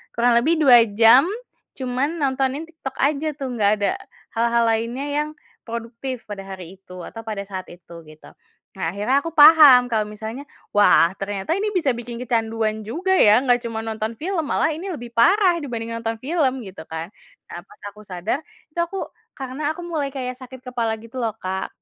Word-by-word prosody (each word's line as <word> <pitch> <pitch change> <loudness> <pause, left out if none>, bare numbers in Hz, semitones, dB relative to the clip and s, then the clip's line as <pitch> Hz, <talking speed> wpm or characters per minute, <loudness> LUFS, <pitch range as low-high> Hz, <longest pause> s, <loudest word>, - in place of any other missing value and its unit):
kurang 235 0 +4
lebih 310 +8 +2
2 245 -7 +6
jam, 230 +8 +6 0.5
cuman 260 +4 -2
nontonin 270 -1 -1
TikTok 320 -5 -9
aja 290 +2 0
tuh, 270 -3 -5
nggak 205 0 +4
ada 200 - +2 0.5
hal-hal 235 0 +3
lainnya 230 +5 -2
yang 300 +1 -1 0.4
produktif 235 +2 -6
pada 205 -2 -7
hari 185 -1 -9
itu 185 -2 -11
atau 225 - -8
pada 210 -2 -3
saat 190 -2 -7
itu 170 -1 -13
gitu. 155 0 -15 0.4
Nah - - -8
akhirnya 245 +7 +2
aku 330 - -4
paham 290 -5 +9
kalau 215 -2 +1
misalnya, 220 +5 -7 0.3
wah, 205 -4 +5
ternyata 195 +5 -4
ini 425 - 0
bisa 315 -7 +2
bikin 240 0 -7
kecanduan 225 -2 -1
juga 365 +10 -2
ya, 215 - +6
nggak 245 -1 +4
cuma 225 -1 -4
nonton 220 0 -4
film 350 - -2
malah - - +1
ini 345 +6 -6
lebih 240 -9 -7
parah 355 - +4
dibanding 230 -4 -5
nonton 230 0 -3
film 265 -5 0
gitu 190 -3 -10
kan. 160 +4 -6 0.4
Nah 175 - -6
pas - - -19
aku 210 - -16
sadar, 185 +8 -2 0.3
itu 340 - -6
aku 355 +3 -3 0.3
karena 270 +3 -3
aku 350 - -8
mulai 315 -5 -2
kayak 255 -2 -4
sakit 255 0 -11
kepala 230 -2 -1
gitu 230 +3 -8
loh, 225 -2 -2
Kak, 190 -1 -3
240 Hz, 180 wpm, -22 LUFS, 220-280 Hz, 0.5 s, paham